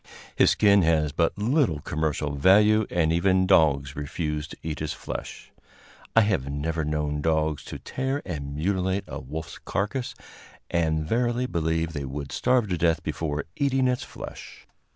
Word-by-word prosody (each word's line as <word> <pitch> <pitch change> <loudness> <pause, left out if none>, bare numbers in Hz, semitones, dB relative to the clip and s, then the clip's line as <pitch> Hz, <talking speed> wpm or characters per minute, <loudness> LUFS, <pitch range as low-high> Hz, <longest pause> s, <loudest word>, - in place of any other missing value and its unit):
His - - +5
skin 100 -2 +5
has 80 -3 +2
but 85 +5 0
little 115 - +1
commercial 75 0 -2
value, 105 +8 +5
and 80 -2 +1
even 95 +2 +3
dogs 70 -5 +3
refuse 75 +1 -3
to - - -11
eat 80 -1 -4
his 75 -1 -3
flesh. - - -7 0.6
I 115 - +8
have 95 -11 0
never 80 +3 -2
known 75 -1 -1
dogs 80 -1 0
to - - -6
tear 135 +2 -3
and 70 -5 -5
mutilate 95 +4 0
a - - -6
wolf's 75 +5 -7
carcass, 115 +6 -3 0.6
and 80 -2 +1
verily 120 +4 +1
believe 80 -5 -1
they 70 -3 -4
would 70 +1 -6
starve 125 -3 +2
to 90 -3 -1
death 85 -1 +2
before 75 -3 -3
eating 135 -2 +2
its 125 -1 0
flesh. - - -10
80 Hz, 155 wpm, -26 LUFS, 75-100 Hz, 0.6 s, I